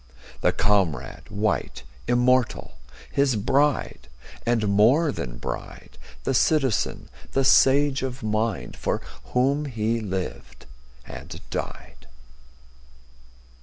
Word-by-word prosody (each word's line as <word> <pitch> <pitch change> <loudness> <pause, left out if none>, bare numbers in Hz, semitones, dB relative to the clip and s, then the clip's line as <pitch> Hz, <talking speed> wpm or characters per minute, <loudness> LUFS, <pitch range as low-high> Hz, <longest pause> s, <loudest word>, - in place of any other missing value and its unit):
The - - +3
comrade, 95 -10 0
white, 100 - -2 0.2
immortal, 125 - +2 0.4
His 140 -3 +2
bride, 130 - +1 0.4
and 115 -3 +2
more 120 +11 +4
than - - -5
bride— - - -7 0.2
The 135 - 0
citizen, 135 -4 +1 0.3
the 135 - +2
sage 140 +2 +5
of 130 -1 -4
mind, 110 -1 -1
For - - -1 0.3
whom 140 +4 +1
he 115 -3 -1
lived 95 - -5 0.4
and - - -9
died. 65 +1 -6
115 Hz, 95 wpm, -25 LUFS, 100-135 Hz, 0.4 s, sage